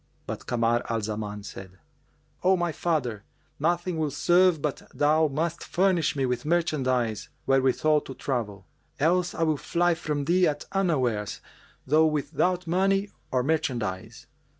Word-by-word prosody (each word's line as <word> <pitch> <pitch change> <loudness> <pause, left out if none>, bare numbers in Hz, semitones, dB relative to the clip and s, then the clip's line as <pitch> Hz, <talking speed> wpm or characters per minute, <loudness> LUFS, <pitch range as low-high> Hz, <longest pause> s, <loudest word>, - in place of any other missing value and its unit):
But - - -6
Kamar 120 0 +1
al 115 -1 0
Zaman 105 -1 -4
said, 95 -2 -10 0.6
"O 185 +1 +4
my 175 -1 0
father, 140 -10 -1 0.4
nothing 175 +2 0
will 155 -1 0
serve 175 +4 +3
but 145 -1 -2
thou 155 +2 +3
must 160 +4 -2
furnish 180 -5 +1
me 135 -2 0
with 125 -1 -1
merchandise 130 - 0 0.2
wherewithal 135 +3 +3
to 135 - -9
travel; 115 -7 -3 0.3
else 175 +4 +2
will 160 -1 +2
I - - -4
fly 175 +4 +1
from 150 -3 -3
thee 180 +3 +4
at 145 -1 -2
unawares 130 - 0 0.5
though 155 +4 +4
without 160 +4 0
money 195 +3 +1 0.2
or 130 -1 +1
merchandise. 115 -8 -2
150 Hz, 140 wpm, -26 LUFS, 125-170 Hz, 0.6 s, O